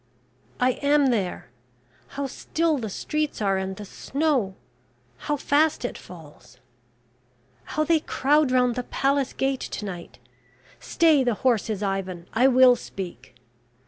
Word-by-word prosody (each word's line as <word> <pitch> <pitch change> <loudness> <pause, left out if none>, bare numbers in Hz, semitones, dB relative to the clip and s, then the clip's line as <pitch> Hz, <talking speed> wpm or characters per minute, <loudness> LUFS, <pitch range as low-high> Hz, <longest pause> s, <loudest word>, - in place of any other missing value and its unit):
"I 250 0 +1
am 285 -2 +3
there... 185 - -3 0.7
How 280 - -1
still 315 +3 -1
the 220 -3 -4
streets 305 +9 -3
are, 195 -2 +1
and 190 0 -3
the 210 - -8
snow 265 -5 -1 0.7
how 295 - +1
fast 290 0 +1
it - - -4
falls. 150 -8 -14 1.1
How 310 - -1
they 320 +1 +3
crowd 295 0 +2
round 250 -1 +3
the 250 - -2
palace 275 +2 0
gate 270 -1 -1
to 210 - -5
night. 175 -4 -8 0.6
Stay 315 -5 +3
the 240 -3 +1
horses, 220 -4 +1
Ivan, 190 -3 -3
I 245 +4 +4
will 255 -1 +6
speak... 170 - -8
250 Hz, 135 wpm, -25 LUFS, 195-285 Hz, 1.1 s, will